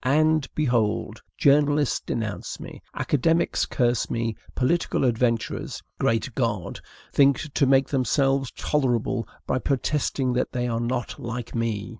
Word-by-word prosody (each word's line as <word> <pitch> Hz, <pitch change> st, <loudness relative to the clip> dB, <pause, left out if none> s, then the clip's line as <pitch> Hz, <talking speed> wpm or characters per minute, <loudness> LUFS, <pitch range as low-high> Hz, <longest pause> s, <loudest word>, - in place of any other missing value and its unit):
And, 155 Hz, +2 st, +3 dB
behold! 120 Hz, -8 st, 0 dB, 0.2 s
journalists 145 Hz, 0 st, +3 dB
denounce 110 Hz, -3 st, -4 dB
me, -, -, -9 dB
academicians 165 Hz, +4 st, +1 dB
curse 120 Hz, -3 st, +1 dB
me, 115 Hz, -1 st, -1 dB, 0.2 s
political 135 Hz, +2 st, +1 dB
adventurers 115 Hz, -1 st, -1 dB, 0.2 s
(great 115 Hz, +3 st, 0 dB
God!) 105 Hz, -7 st, -2 dB, 0.3 s
think 140 Hz, +1 st, +3 dB
to 140 Hz, -, +3 dB
make 135 Hz, 0 st, +4 dB
themselves 135 Hz, 0 st, +1 dB
tolerable 120 Hz, -5 st, 0 dB, 0.2 s
by 130 Hz, -, 0 dB
protesting 135 Hz, -1 st, 0 dB
that 125 Hz, -, -1 dB
they 125 Hz, -1 st, -1 dB
are 115 Hz, -1 st, -1 dB
not 120 Hz, 0 st, -3 dB
like 120 Hz, 0 st, -5 dB
me! 115 Hz, -3 st, -2 dB
125 Hz, 125 wpm, -25 LUFS, 115-140 Hz, 0.3 s, make